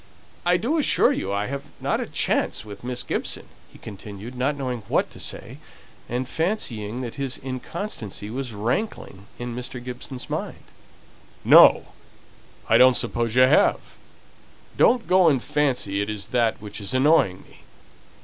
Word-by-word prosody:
"I 175 Hz, 0 st, +4 dB
do 270 Hz, -, 0 dB
assure 295 Hz, -, +3 dB
you 95 Hz, -, -2 dB
I 100 Hz, +1 st, -1 dB
haven't 140 Hz, +3 st, -8 dB, 0.2 s
a -, -, -2 dB
chance -, -, 0 dB
with 100 Hz, 0 st, -10 dB
Miss 125 Hz, 0 st, -2 dB
Gibson," -, -, -3 dB, 0.3 s
he -, -, -15 dB
continued, 105 Hz, +2 st, -9 dB
not 130 Hz, +4 st, -1 dB
knowing 130 Hz, -3 st, -3 dB
what -, -, 0 dB
to -, -, -11 dB
say, -, -, -6 dB, 0.5 s
and 125 Hz, +2 st, -2 dB
fancying 130 Hz, -, -2 dB
that 125 Hz, +3 st, -6 dB
his 135 Hz, -2 st, -2 dB
inconstancy 130 Hz, -, -6 dB
was 130 Hz, 0 st, -4 dB
rankling 110 Hz, -, -3 dB
in 120 Hz, -1 st, -5 dB
Mr. 125 Hz, +1 st, -5 dB
Gibson's 125 Hz, +1 st, -7 dB
mind. -, -, -5 dB, 0.8 s
"No! -, -, +7 dB, 0.8 s
I -, -, +5 dB
don't 130 Hz, -1 st, +7 dB
suppose 120 Hz, -1 st, -1 dB
you 130 Hz, -, +7 dB
have. 130 Hz, +4 st, +3 dB, 0.8 s
Don't 245 Hz, -2 st, +4 dB
go 185 Hz, -2 st, +5 dB
and 140 Hz, -4 st, +2 dB
fancy 130 Hz, -9 st, 0 dB
it 100 Hz, -, -3 dB
is 105 Hz, -2 st, -5 dB
that 120 Hz, -3 st, +1 dB
which 105 Hz, 0 st, -8 dB
is 100 Hz, +6 st, -2 dB
annoying 130 Hz, -, +3 dB
me. -, -, -19 dB
125 Hz, 150 wpm, -24 LUFS, 105-140 Hz, 0.8 s, No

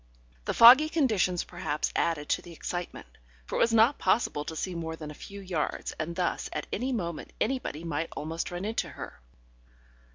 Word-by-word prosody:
The -, -, -1 dB
foggy 260 Hz, +7 st, +9 dB
conditions 215 Hz, -, +1 dB
perhaps 175 Hz, -4 st, -3 dB
added 155 Hz, -3 st, 0 dB
to -, -, +1 dB
the 175 Hz, -, -12 dB
excitement, 175 Hz, +2 st, -5 dB, 0.4 s
for -, -, -5 dB
it -, -, +1 dB
was 230 Hz, -, +4 dB
not 230 Hz, +5 st, +4 dB
possible 180 Hz, -10 st, +1 dB
to 160 Hz, -, -5 dB
see 185 Hz, +3 st, -3 dB
more 165 Hz, -1 st, -4 dB
than 155 Hz, -2 st, -8 dB
a -, -, -8 dB
few 200 Hz, +6 st, -10 dB
yards, 180 Hz, -6 st, -2 dB
and 165 Hz, +2 st, -3 dB
thus 180 Hz, 0 st, -1 dB
at -, -, -3 dB
any 255 Hz, +5 st, -1 dB
moment 170 Hz, -9 st, -4 dB
anybody 225 Hz, -, -2 dB
might 165 Hz, -1 st, -2 dB
almost 160 Hz, +2 st, -3 dB
run 175 Hz, +2 st, -5 dB
into 220 Hz, +2 st, -2 dB
her. -, -, -9 dB
175 Hz, 185 wpm, -29 LUFS, 160-225 Hz, 0.4 s, foggy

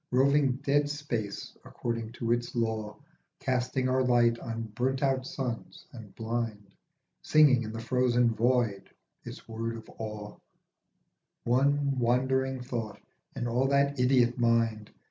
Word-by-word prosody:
Roving 135 Hz, +1 st, +3 dB
dead 145 Hz, +1 st, +2 dB
space 120 Hz, -9 st, -4 dB
according 115 Hz, -1 st, -4 dB
to 115 Hz, 0 st, -2 dB
its 120 Hz, +1 st, -1 dB
law, 110 Hz, -2 st, -2 dB, 0.4 s
Casting 130 Hz, 0 st, 0 dB
our 130 Hz, 0 st, +2 dB
light 120 Hz, -2 st, +3 dB
on 115 Hz, -1 st, -4 dB
burnt 130 Hz, +4 st, -1 dB
out 135 Hz, -1 st, +1 dB
suns 125 Hz, -5 st, -5 dB
and 110 Hz, -5 st, -11 dB
blind, 110 Hz, -3 st, -4 dB, 0.5 s
Singing 145 Hz, -5 st, +5 dB
in 110 Hz, -2 st, -5 dB
the 115 Hz, -, -6 dB
frozen 120 Hz, -1 st, +2 dB
void 115 Hz, -3 st, +1 dB, 0.3 s
its -, -, -10 dB
word 115 Hz, 0 st, -4 dB
of 110 Hz, -, -11 dB
awe, 105 Hz, -1 st, -6 dB, 1.1 s
One 140 Hz, +2 st, +2 dB
wandering 130 Hz, +2 st, +1 dB
thought 115 Hz, -4 st, -5 dB, 0.4 s
in 120 Hz, -, -3 dB
all 125 Hz, +3 st, +1 dB
that 140 Hz, 0 st, +2 dB
idiot 125 Hz, -1 st, +3 dB
mind. 115 Hz, -2 st, +1 dB
120 Hz, 130 wpm, -29 LUFS, 115-130 Hz, 1.1 s, Singing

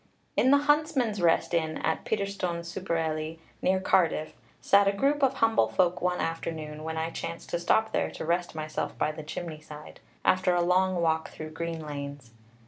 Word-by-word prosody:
In 260 Hz, -, +4 dB
the 285 Hz, -, +7 dB
Huntsman's 285 Hz, -, +1 dB
Rest 170 Hz, 0 st, +3 dB
Inn 160 Hz, -2 st, 0 dB
at 160 Hz, -, -1 dB
Peterstone 200 Hz, -5 st, -2 dB
super 175 Hz, 0 st, -2 dB
Ely, 155 Hz, 0 st, -2 dB, 0.3 s
near 190 Hz, +1 st, +2 dB
Cardiff, 170 Hz, -4 st, +2 dB, 0.3 s
sat 200 Hz, 0 st, +4 dB
a -, -, +5 dB
group 280 Hz, +8 st, +1 dB
of 270 Hz, -1 st, +3 dB
humble 225 Hz, -2 st, +3 dB
folk 180 Hz, -1 st, +1 dB
one 180 Hz, 0 st, 0 dB
afternoon, 155 Hz, -2 st, -4 dB
when 160 Hz, 0 st, -4 dB
I 160 Hz, +1 st, -1 dB
chanced 165 Hz, 0 st, -6 dB
to 170 Hz, -, 0 dB
stop 220 Hz, +5 st, +2 dB
there -, -, 0 dB
to -, -, -6 dB
rest 175 Hz, +1 st, 0 dB
myself 155 Hz, 0 st, -4 dB
by 155 Hz, -, +1 dB
the 155 Hz, -, -8 dB
chimney 155 Hz, 0 st, -6 dB
side, 150 Hz, -1 st, -11 dB, 0.3 s
after 185 Hz, -1 st, +3 dB
a 175 Hz, -, +3 dB
long 185 Hz, +1 st, +3 dB
walk 160 Hz, -1 st, +1 dB
through 155 Hz, 0 st, -8 dB
green 165 Hz, 0 st, -4 dB
lanes. 140 Hz, -4 st, -7 dB
170 Hz, 185 wpm, -28 LUFS, 160-190 Hz, 0.3 s, the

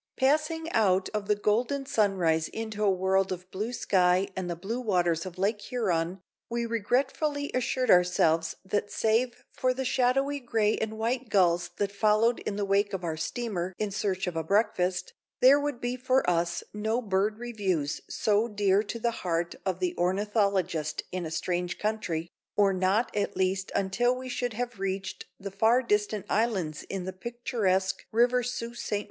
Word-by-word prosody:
Passing 305 Hz, +4 st, +1 dB
out 190 Hz, -4 st, +2 dB
of 210 Hz, -1 st, -3 dB
the 210 Hz, -, +3 dB
golden 240 Hz, +7 st, 0 dB
sunrise 185 Hz, -, +2 dB
into 220 Hz, -1 st, -4 dB
a 205 Hz, -, +4 dB
world 190 Hz, 0 st, +2 dB
of 185 Hz, 0 st, -6 dB
blue 210 Hz, +5 st, -3 dB
sky 185 Hz, -4 st, +2 dB
and 185 Hz, -1 st, -3 dB
the 175 Hz, -, -2 dB
blue 200 Hz, +8 st, -4 dB
waters 175 Hz, -7 st, +1 dB
of 185 Hz, 0 st, -9 dB
Lake 205 Hz, +3 st, 0 dB
Huron, 185 Hz, -6 st, -1 dB, 0.3 s
we 235 Hz, 0 st, -1 dB
regretfully 265 Hz, +6 st, 0 dB
assured 255 Hz, 0 st, +1 dB
ourselves 165 Hz, -2 st, +3 dB
that 205 Hz, +1 st, -1 dB
save 230 Hz, +2 st, 0 dB
for 255 Hz, 0 st, 0 dB
the 265 Hz, +1 st, -2 dB
shadowy 270 Hz, +3 st, +1 dB
gray 225 Hz, -4 st, +1 dB
and 220 Hz, 0 st, -3 dB
white 240 Hz, +2 st, -1 dB
gulls 175 Hz, -3 st, +3 dB
that 200 Hz, -1 st, 0 dB
followed 215 Hz, +3 st, +3 dB
in 205 Hz, -, -1 dB
the 205 Hz, 0 st, -1 dB
wake 200 Hz, +1 st, +1 dB
of 190 Hz, -2 st, -3 dB
our 165 Hz, -2 st, -2 dB
steamer 185 Hz, +1 st, -3 dB
in 210 Hz, -1 st, -2 dB
search 195 Hz, -1 st, -1 dB
of 180 Hz, -2 st, -4 dB
a 165 Hz, -, -1 dB
breakfast, 185 Hz, -1 st, +1 dB, 0.3 s
there 270 Hz, +3 st, +7 dB
would 290 Hz, -4 st, -2 dB
be 245 Hz, 0 st, -2 dB
for 255 Hz, +1 st, +1 dB
us 170 Hz, -1 st, +1 dB
no 220 Hz, +3 st, 0 dB
bird 210 Hz, -1 st, 0 dB
reviews 195 Hz, -11 st, -2 dB
so 215 Hz, +2 st, +2 dB
dear 205 Hz, -2 st, +2 dB
to 220 Hz, +2 st, -5 dB
the 235 Hz, +1 st, 0 dB
heart 170 Hz, -1 st, -1 dB
of 185 Hz, -2 st, 0 dB
the 180 Hz, -1 st, -1 dB
ornithologist 190 Hz, -4 st, 0 dB
in 180 Hz, -2 st, -3 dB
a -, -, -5 dB
strange 175 Hz, +2 st, -2 dB
country, 210 Hz, -7 st, -2 dB, 0.3 s
or 200 Hz, -1 st, +4 dB
not 190 Hz, +6 st, +1 dB
at 205 Hz, -, -1 dB
least 190 Hz, 0 st, 0 dB
until 210 Hz, +6 st, +2 dB
we 255 Hz, 0 st, -6 dB
should 245 Hz, -1 st, -2 dB
have 240 Hz, -1 st, -4 dB
reached 195 Hz, 0 st, -3 dB
the 200 Hz, 0 st, -6 dB
far 225 Hz, +6 st, +3 dB
distant 210 Hz, -2 st, 0 dB
islands 190 Hz, -9 st, 0 dB
in 195 Hz, -2 st, -3 dB
the 190 Hz, +1 st, -5 dB
picturesque 195 Hz, -4 st, -1 dB
River 245 Hz, +2 st, +3 dB
Sault 240 Hz, -1 st, -4 dB
Ste. -, -, -4 dB
205 Hz, 175 wpm, -28 LUFS, 185-235 Hz, 0.3 s, there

